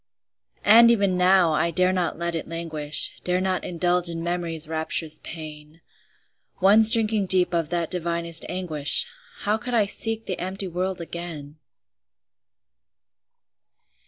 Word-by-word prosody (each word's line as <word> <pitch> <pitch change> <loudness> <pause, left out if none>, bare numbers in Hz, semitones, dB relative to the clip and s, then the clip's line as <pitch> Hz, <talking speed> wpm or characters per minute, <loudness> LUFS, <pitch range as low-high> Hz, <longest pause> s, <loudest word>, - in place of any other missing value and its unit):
And 230 +3 +7
even 200 -5 +1
now, 180 -2 +3
I 170 +2 0
dare 180 +3 +1
not 180 -3 -2
let 170 0 -4
it 165 - -5
languish, 160 -3 +1
Dare 180 0 -1
not 185 0 -2
indulge 175 0 -1
in 165 0 -6
Memory's 170 -3 -3
rapturous 160 0 -2
pain; 155 -1 -11 0.8
Once 210 +3 +6
drinking 220 -3 +2
deep 180 -1 +3
of 165 -3 -1
that 170 -2 -3
divinest 170 -2 -1
anguish, 160 -5 +2 0.4
How 210 +2 -1
could 245 +1 -5
I 215 -3 +2
seek 225 +2 -2
the 185 - -5
empty 190 +2 -5
world 180 +1 -4
again? 160 -3 -8
175 Hz, 130 wpm, -23 LUFS, 165-190 Hz, 0.8 s, And